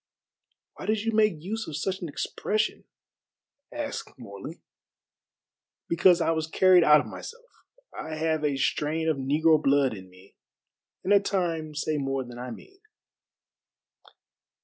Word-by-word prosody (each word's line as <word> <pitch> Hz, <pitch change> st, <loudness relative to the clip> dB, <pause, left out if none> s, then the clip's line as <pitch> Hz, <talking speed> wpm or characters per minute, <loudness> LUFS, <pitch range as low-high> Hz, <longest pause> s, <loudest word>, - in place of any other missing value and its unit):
"Why -, -, -9 dB
did 215 Hz, 0 st, +1 dB
you 225 Hz, -, 0 dB
make 215 Hz, -8 st, +2 dB
use 220 Hz, +4 st, -4 dB
of 150 Hz, -, -5 dB
such 190 Hz, +4 st, -2 dB
an 170 Hz, -, -4 dB
expression?" 215 Hz, +8 st, -2 dB, 0.9 s
asked 295 Hz, -2 st, -5 dB
Morley. -, -, -10 dB, 1.2 s
"Because 175 Hz, +1 st, +4 dB
I 165 Hz, -, +2 dB
was 160 Hz, -1 st, -1 dB
carried 185 Hz, +1 st, +5 dB
out 150 Hz, -1 st, +7 dB
of -, -, -9 dB
myself. -, -, -9 dB, 0.5 s
I 155 Hz, 0 st, -5 dB
have 155 Hz, 0 st, -1 dB
a 145 Hz, -2 st, 0 dB
strain 155 Hz, +4 st, 0 dB
of 160 Hz, -3 st, +1 dB
negro 150 Hz, +4 st, +3 dB
blood 140 Hz, -3 st, +3 dB
in 95 Hz, -3 st, -10 dB
me, 95 Hz, +2 st, -19 dB, 0.7 s
and 195 Hz, -, +2 dB
at 200 Hz, 0 st, +5 dB
times 165 Hz, -5 st, -1 dB
say 155 Hz, -1 st, -1 dB
more 135 Hz, -1 st, -2 dB
than 120 Hz, -1 st, -10 dB
I 125 Hz, +1 st, -6 dB
mean." 385 Hz, -, -12 dB
160 Hz, 145 wpm, -27 LUFS, 145-190 Hz, 1.2 s, out